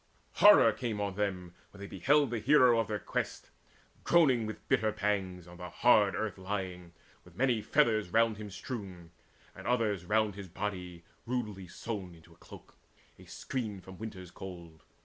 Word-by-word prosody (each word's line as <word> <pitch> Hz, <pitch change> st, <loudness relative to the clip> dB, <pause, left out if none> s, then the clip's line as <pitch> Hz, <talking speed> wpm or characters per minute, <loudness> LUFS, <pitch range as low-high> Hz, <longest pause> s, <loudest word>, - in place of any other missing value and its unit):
Horror 205 Hz, -, +8 dB
came 110 Hz, -1 st, -4 dB
on 100 Hz, -1 st, -2 dB
them 95 Hz, -3 st, -3 dB, 0.2 s
When 100 Hz, -, -16 dB
they 100 Hz, -, -6 dB
beheld 135 Hz, -, +2 dB
the 120 Hz, -, -1 dB
hero 125 Hz, 0 st, +5 dB
of 115 Hz, -, 0 dB
their 105 Hz, -, -2 dB
quest -, -, -4 dB, 0.5 s
Groaning 135 Hz, -10 st, +4 dB
with 110 Hz, -, -8 dB
bitter 110 Hz, -5 st, +2 dB
pangs, 95 Hz, -4 st, -2 dB
on 85 Hz, 0 st, -12 dB
the 90 Hz, 0 st, -7 dB
hard 105 Hz, -1 st, +4 dB
earth 105 Hz, -3 st, -3 dB
Lying, 95 Hz, -3 st, -5 dB, 0.3 s
with 90 Hz, -1 st, -18 dB
many 120 Hz, 0 st, +1 dB
feathers 110 Hz, -5 st, +2 dB
round 115 Hz, +1 st, +2 dB
him 105 Hz, -1 st, -7 dB
strewn, 95 Hz, -6 st, -7 dB, 0.4 s
And -, -, -9 dB
others 110 Hz, -7 st, +1 dB
round 110 Hz, +1 st, +1 dB
his 100 Hz, -1 st, -8 dB
body, 90 Hz, -2 st, -5 dB, 0.2 s
rudely 105 Hz, -7 st, -3 dB
sewn 95 Hz, -3 st, -6 dB
Into 85 Hz, +1 st, -18 dB
a -, -, -24 dB
cloak, -, -, -15 dB, 0.4 s
a -, -, -14 dB
screen 110 Hz, -6 st, -5 dB
from 95 Hz, 0 st, -13 dB
winter's 95 Hz, -5 st, -8 dB
cold. 85 Hz, -4 st, -10 dB
105 Hz, 170 wpm, -31 LUFS, 90-115 Hz, 0.5 s, Horror